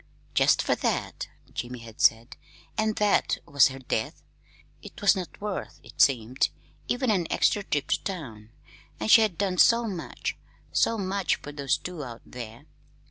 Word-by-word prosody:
"Jest - - +4
fer - - +2
that," - - -2 0.3
Jim 125 +1 -4
had 115 -2 -10
said, 115 +1 +3 0.4
and 220 -1 0
"that" 210 -1 +2
was 140 -2 +5
her 135 - -7
death. 125 -4 -3 0.6
It - - -11
was 205 0 +5
not 185 -3 -6
worth, 205 -2 -5
it - - -4
seemed, 125 -1 +3 0.4
even 245 -1 +1
an 180 -5 +1
extra 205 - +2
trip 145 -7 -2
to - - 0
town! 120 - -6 0.5
And 220 - 0
she 225 - +9
had 210 -6 +1
done 190 -3 -1
so 235 0 +6
much 185 -6 -4 0.4
so 230 - +2
much 195 -1 0
for 145 - -9
those 140 -2 0
two 180 -4 -6
out 120 -3 -9
there! 115 -2 -9
160 Hz, 165 wpm, -27 LUFS, 125-205 Hz, 0.6 s, she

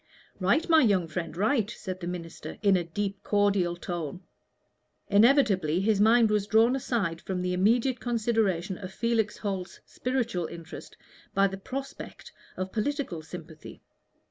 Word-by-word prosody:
"Right, 200 - +2
my 320 -1 +6
young 195 -8 +3
friend, 165 0 -5
right," 215 +1 +1
said 185 -5 -6
the 175 - -5
minister, 170 -2 -7
in 200 -2 +5
a 180 - +1
deep 195 +4 -4
cordial 200 -4 +1
tone. 175 -1 -5 0.9
Inevitably 200 - +4
his 205 +1 +2
mind 225 0 +5
was 210 -1 +1
drawn 225 +4 +4
aside 200 -11 -1
from 185 -1 -3
the 180 0 -1
immediate 230 +7 +2
consideration 215 -6 0
of 185 -2 -7
Felix 225 0 0
Holt's 195 -3 -4
spiritual 235 -9 -2
interest 170 +1 -10 0.4
by 195 - +5
the 195 0 -2
prospect 270 +7 -7 0.3
of 185 0 -3
political 235 - -2
sympathy. 160 -1 -11
195 Hz, 145 wpm, -28 LUFS, 180-230 Hz, 0.9 s, my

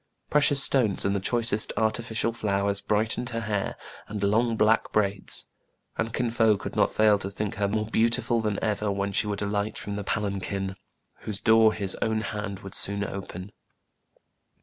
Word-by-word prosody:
Precious 145 -1 +4
stones 115 -8 +2
and 100 +1 +1
the - - +1
choicest 115 +1 0
artificial 115 +1 0
flowers 100 -2 0
brightened 110 +4 0
her 115 -2 -3
hair 105 -3 -2 0.3
and 105 -1 -5
long 115 +3 +2
black 110 +1 +3
braids; 100 -2 -1 0.5
and 115 - -2
Kin 120 0 -1
Fo 110 -2 +3
could - - -7
not - - +3
fail 105 -1 +4
to 95 - -4
think 100 +1 -3
her 100 0 +1
more 105 +1 -1
beautiful 115 +1 +2
than 105 -2 -1
ever 105 -1 0
when 100 0 -1
she 105 - 0
would 105 -1 -2
'alight 100 +1 -2
from 100 0 -5
the 105 - -4
palanquin, 100 -1 -2 0.4
whose 105 -2 -3
door 110 -1 +5
his 100 -3 -1
own 110 -1 +1
hand 105 -3 -5
would 95 - -9
soon 100 0 0
open. 95 -1 -6
105 Hz, 170 wpm, -26 LUFS, 100-110 Hz, 0.5 s, door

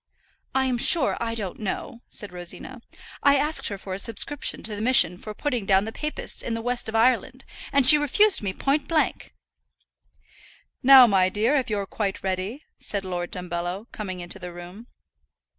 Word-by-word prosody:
"I'm 260 -2 +1
sure 310 +1 +4
I 230 -1 -3
don't 200 -5 -5
know," 230 +4 -5
said 205 -3 -7
Rosina. 180 +8 -8 0.4
"I 280 0 +5
asked 300 +3 0
her 200 - -4
for 190 -1 -7
a 190 - -3
subscription 230 +7 -3
to 215 -1 -2
the 205 - -6
mission 215 -7 +4
for 215 -1 -8
putting 245 -8 -2
down 195 +1 +4
the 220 - -5
Papists 300 +5 -5
in 230 - -3
the 230 - -4
west 245 -2 -2
of 220 - -5
Ireland, 255 +3 +1 0.3
and 280 -2 +3
she 300 +3 +8
refused 390 +9 +3
me 200 -3 -2
point 275 +9 -1
blank." 310 - -1 1.5
"Now, 265 -1 +9
my 190 -4 +3
dear, 220 +8 +1
if 265 -5 0
you're 205 -2 -1
quite 195 0 -4
ready," 190 +9 -3 0.2
said 200 -2 -4
Lord 175 -1 -4
Dumbello, 180 +3 -5
coming 185 -4 -6
into 175 +2 -6
the 180 -1 -7
room. 175 +6 -11
220 Hz, 175 wpm, -24 LUFS, 190-260 Hz, 1.5 s, Now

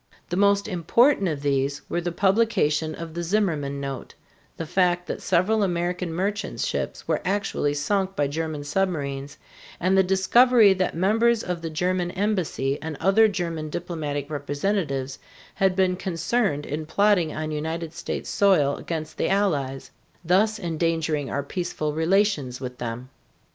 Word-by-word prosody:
The - - 0
most 200 +1 +3
important 200 - +3
of 150 -4 -3
these 140 0 0
were 175 - -1
the 175 0 -2
publication 170 -6 +1
of 165 -1 -7
the 170 - -3
Zimmerman 165 -7 0
note, 135 -2 -6 0.4
the 165 - -4
fact 180 +1 +1
that - - -5
several 190 +5 +2
American 175 -2 -1
merchant 200 +5 -2
ships - - -3
were - - 0
actually 190 -7 -1
sunk 195 +6 0
by 145 - +1
German 155 0 -3
submarines, 145 -4 -2 0.4
and 185 +2 +2
the 190 - +6
discovery 205 +4 +5
that 185 -3 -1
members 220 +6 +2
of 180 -2 -3
the 165 - -4
German 180 +2 0
embassy 180 -8 -1
and 160 -2 -5
other 195 +5 +5
German 170 -6 -3
diplomatic 150 -4 -4
representatives 145 -2 -2 0.3
had 190 -1 +1
been 185 -1 +2
concerned 185 -2 -1
in 150 +2 -4
plotting 200 -3 +3
on 155 0 -4
United 160 +2 -4
States - - -5
soil 175 -9 +3
against 160 -2 -5
the - - +1
Allies, 150 -10 0 0.3
thus 210 +6 +3
endangering 160 -5 -1
our 140 - -2
peaceful 155 -1 -3
relations 160 -6 +1
with 125 -1 -7
them. 120 +2 -5
170 Hz, 150 wpm, -24 LUFS, 150-195 Hz, 0.4 s, the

